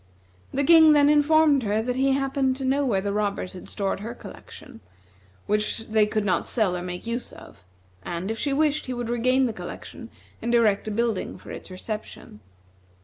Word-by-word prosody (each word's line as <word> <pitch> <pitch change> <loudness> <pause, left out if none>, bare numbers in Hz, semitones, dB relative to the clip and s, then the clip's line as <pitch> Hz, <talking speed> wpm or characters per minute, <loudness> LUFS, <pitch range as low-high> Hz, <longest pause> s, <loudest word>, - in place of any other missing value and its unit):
The 280 - 0
King 320 +1 +7
then 290 -1 +5
informed 300 -1 +4
her 215 -1 0
that 250 +1 -2
he 270 +1 +2
happened 270 -1 0
to 265 0 -5
know 275 +2 +1
where 215 -8 +1
the 200 0 -2
robbers 200 -3 -2
had 185 - -10
stored 195 -1 -2
her 230 +4 -6
collection, 240 -1 -12 0.7
which 210 +2 -1
they 215 -1 +3
could 210 0 -1
not 185 - 0
sell 210 -7 0
or 180 - -4
make 180 +2 -6
use 235 +2 -4
of, - - -15 0.4
and 175 - -4
if 225 - -5
she 285 - -1
wished, 300 +1 +1
he 255 - -3
would 240 -1 -4
regain 255 +2 +2
the 235 - -2
collection - - -9 0.3
and 235 0 0
erect 215 -3 +2
a - - -2
building 225 -1 -2
for - - -12
its - - -9
reception. 185 - -7
235 Hz, 195 wpm, -25 LUFS, 205-270 Hz, 0.7 s, King